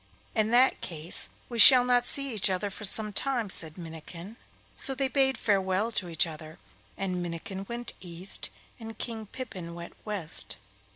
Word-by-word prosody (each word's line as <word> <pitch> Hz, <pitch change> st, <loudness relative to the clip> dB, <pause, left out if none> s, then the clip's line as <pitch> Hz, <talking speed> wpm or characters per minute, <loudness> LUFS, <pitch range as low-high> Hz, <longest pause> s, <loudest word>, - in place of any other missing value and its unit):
'In 215 Hz, -1 st, +1 dB
that 245 Hz, +3 st, +4 dB
case 165 Hz, 0 st, 0 dB, 0.2 s
we 235 Hz, -2 st, -5 dB
shall 250 Hz, +2 st, +10 dB
not 245 Hz, -1 st, +2 dB
see 275 Hz, -2 st, -1 dB
each 205 Hz, -2 st, +4 dB
other 190 Hz, +2 st, -2 dB
for 215 Hz, -, -5 dB
some 210 Hz, +1 st, +3 dB
time,' 245 Hz, -4 st, -1 dB
said 160 Hz, -1 st, -1 dB
Minnikin; 170 Hz, +4 st, -10 dB, 0.4 s
so 270 Hz, -, -2 dB
they 270 Hz, 0 st, 0 dB
bade 265 Hz, 0 st, +1 dB
farewell 195 Hz, +1 st, 0 dB
to 185 Hz, -5 st, -2 dB
each 165 Hz, +2 st, +2 dB
other, 155 Hz, 0 st, -10 dB, 0.4 s
and 185 Hz, -2 st, -2 dB
Minnikin 190 Hz, +3 st, -6 dB
went 240 Hz, 0 st, -3 dB
east 180 Hz, +1 st, -3 dB, 0.3 s
and 225 Hz, -1 st, -9 dB
King 225 Hz, -3 st, -5 dB
Pippin 185 Hz, -9 st, -8 dB
went 170 Hz, 0 st, -9 dB
west. 200 Hz, -7 st, -4 dB
200 Hz, 165 wpm, -28 LUFS, 175-235 Hz, 0.4 s, shall